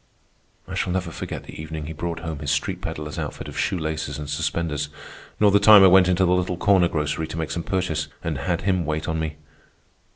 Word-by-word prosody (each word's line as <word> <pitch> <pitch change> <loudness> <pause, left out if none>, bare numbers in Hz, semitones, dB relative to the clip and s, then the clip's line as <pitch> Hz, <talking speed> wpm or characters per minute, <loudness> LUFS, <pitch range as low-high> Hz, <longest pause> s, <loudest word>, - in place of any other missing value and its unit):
I - - -7
shall - - -1
never 90 -2 -2
forget - - -6
the - - -9
evening 80 -1 -6
he 80 - -6
brought 85 +1 -4
home 80 -3 -5
his 75 - -4
street 75 0 -1
pedler's 75 0 -5
outfit - - -5
of - - -9
shoe - - 0
laces 80 -1 -3
and 75 -1 -6
suspenders, 75 -1 -2 0.5
nor 105 -1 +5
the 100 - +5
time 105 -1 +9
I - - +9
went 90 0 +6
into 90 +1 +3
the 90 - +3
little 90 0 0
corner 95 -2 +4
grocery 75 0 -2
to 80 - -7
make 80 -1 -3
some 85 - -2
purchase 85 -5 -1 0.2
and 80 -5 -2
had 85 +4 -1
him 95 -2 +1
wait 80 0 -2
on 80 -1 -1
me. 80 -1 -3
80 Hz, 225 wpm, -23 LUFS, 75-90 Hz, 0.5 s, time